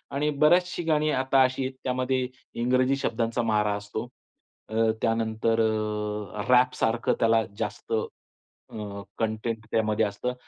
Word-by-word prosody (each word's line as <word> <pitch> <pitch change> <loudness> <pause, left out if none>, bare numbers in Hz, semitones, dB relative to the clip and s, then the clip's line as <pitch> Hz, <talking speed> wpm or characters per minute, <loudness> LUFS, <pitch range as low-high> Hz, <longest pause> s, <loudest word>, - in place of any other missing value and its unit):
आणि 150 +2 +1
बरीचशी 175 +2 +3
गाणी 155 -1 +2
आता 135 +1 +3
अशी 130 +1 0
आहेत 130 - -4
त्यामध्ये 130 0 0 0.4
इंग्रजी 130 +2 +3
शब्दांचा 115 -2 -1
मारा 105 -2 +2
असतो. 105 +3 -5 0.6
अ, 110 0 +2
त्यानंतर 115 0 +1
अ, 105 -2 -2
रॅपसारखं 125 -2 +3
त्याला 115 -1 +4 0.2
जास्त 105 +1 -4 0.8
अ, 100 -2 -6 0.2
कंटेंट 110 0 -2
त्यामध्ये 110 0 +2
असतं. 105 +5 -3
115 Hz, 120 wpm, -26 LUFS, 110-130 Hz, 0.8 s, त्याला